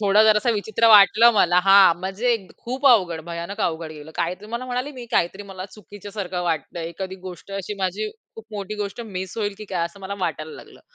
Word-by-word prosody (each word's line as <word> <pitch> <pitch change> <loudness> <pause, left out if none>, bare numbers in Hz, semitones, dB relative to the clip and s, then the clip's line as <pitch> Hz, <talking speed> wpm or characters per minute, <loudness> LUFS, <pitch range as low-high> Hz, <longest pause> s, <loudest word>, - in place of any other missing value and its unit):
थोडा 205 +1 +4
जरासा 215 +3 +3
विचित्र 220 +2 +1
वाटलं 210 +3 +8
मला 180 -3 +4
हां, 195 -3 +7
म्हणजे 200 +6 -1 0.3
खूप 260 +4 -2
अवघड, 175 -8 +1
भयानक 170 +5 -5
अवघड 160 -2 -4
गेलं. 150 +1 -11
काहीतरी 180 +5 -3
मला 245 +2 -3
म्हणाले 250 +3 -2
मी 245 - -7
काहीतरी 190 +4 0
मला 185 -1 -7
चुकीच्या 205 -1 -12
सारखं 185 -4 -4
वाटतंय. 165 +1 -3
एखादी 185 +3 -6
गोष्ट 180 +2 -11
अशी 195 +2 -5
माझी 195 +4 -1 0.3
खूप 225 - -11
मोठी 205 0 -5
गोष्ट 200 +3 -6 0.2
मिस 185 +2 -5
होईल 205 -2 -1
की 215 - -7
काय 170 -2 +1
असं 170 +4 -8
मला 200 - -4
वाटायला 155 -2 -4
लागलं. - - -14
195 Hz, 195 wpm, -23 LUFS, 175-215 Hz, 0.3 s, वाटलं